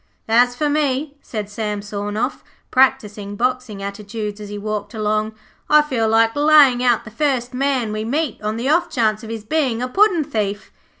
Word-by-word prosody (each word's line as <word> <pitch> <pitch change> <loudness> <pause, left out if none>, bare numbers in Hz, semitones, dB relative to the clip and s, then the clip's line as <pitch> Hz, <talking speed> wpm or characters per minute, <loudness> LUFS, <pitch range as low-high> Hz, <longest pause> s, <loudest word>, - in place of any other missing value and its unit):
'As 245 +2 +4
for 300 +3 0
me,' 290 -1 0
said 215 -3 -5
Sam 210 -1 -4
Sawnoff, 205 +5 -3 0.3
practising 215 -6 +1
boxing 250 -3 -2
attitudes 210 +1 -5
as 205 - -8
he 205 - -6
walked 210 +1 -4
along, 215 0 -1 0.3
'I 300 0 +6
feel 240 -7 0
like 225 0 +3
laying 290 -4 +5
out 240 -3 +2
the 215 - -10
first 255 -1 -1
man 255 -4 0
we 215 0 -3
meet 280 +2 -2
on 215 +1 -2
the 240 +3 -2
off 345 +4 +2
chance 220 -7 0
of 220 - -8
his 225 -2 -5
being 265 -4 0
a 250 - -2
puddin' 375 +2 +3
thief.' 210 -7 -3
230 Hz, 180 wpm, -20 LUFS, 210-270 Hz, 0.3 s, I